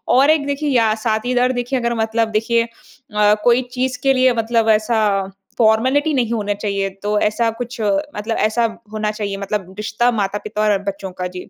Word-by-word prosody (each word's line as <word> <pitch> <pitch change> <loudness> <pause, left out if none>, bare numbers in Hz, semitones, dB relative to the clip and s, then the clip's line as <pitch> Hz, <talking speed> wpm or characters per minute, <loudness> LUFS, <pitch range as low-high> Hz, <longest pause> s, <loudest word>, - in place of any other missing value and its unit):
और 270 +3 +5
एक 310 -2 +1
देखिए 285 +1 -1
या 230 -5 +3
साथीदार 245 +3 0
देखिए 245 +1 -1
अगर 235 0 -1
मतलब 225 0 0
देखिए 230 +2 +1
अ, 210 -2 -1
कोई 245 +2 +4
चीज़ 255 0 -1
के 270 0 +4
लिए 255 -1 +3
मतलब 225 -1 +1
ऐसा 220 +2 +2 0.6
फॉर्मेलिटी 255 +7 +3
नहीं 245 -4 0
होना 205 -2 -1
चाहिए, 200 -1 -2
तो 205 +2 -2
ऐसा 225 +3 +1
कुछ 245 0 -6
मतलब 210 +1 -1
ऐसा 230 +2 +1 0.3
होना 215 -1 -1
चाहिए 205 -2 -4
मतलब 200 -2 -4
रिश्ता 220 +3 0
माता-पिता 210 0 -2
और 210 -1 +3
बच्चों 195 -1 -4
का। 180 0 -4
जी। 180 - -9
225 Hz, 180 wpm, -19 LUFS, 210-245 Hz, 0.6 s, और